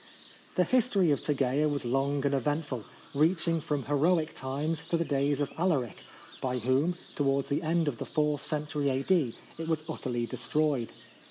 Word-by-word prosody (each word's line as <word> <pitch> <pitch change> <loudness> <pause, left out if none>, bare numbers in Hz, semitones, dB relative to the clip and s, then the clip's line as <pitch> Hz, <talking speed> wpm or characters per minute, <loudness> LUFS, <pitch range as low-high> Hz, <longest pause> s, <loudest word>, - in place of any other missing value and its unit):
The 180 - +4
history 205 -5 +3
of 145 - +1
Tegea 145 +1 +1
was 145 -3 -2
long 135 +3 +1
and 140 - +2
eventful, 140 -3 -1 0.3
reaching 165 +2 +2
from 145 -4 -2
heroic 155 +3 +2
times 145 +5 -2
to 170 - +2
the 165 - 0
days 140 0 +1
of 145 - -1
Alaric, 150 - +1 0.4
by 125 -1 -1
whom, 130 +9 +1 0.2
towards 140 -1 +1
the 145 +2 +1
end 165 0 +1
of 130 -6 -2
the - - -3
fourth 150 -1 0
century 150 -1 -1
A.D., 135 -1 +1 0.2
it 165 - -4
was 160 -1 0
utterly 125 -7 -2
destroyed. 145 -2 0
145 Hz, 165 wpm, -30 LUFS, 135-160 Hz, 0.4 s, The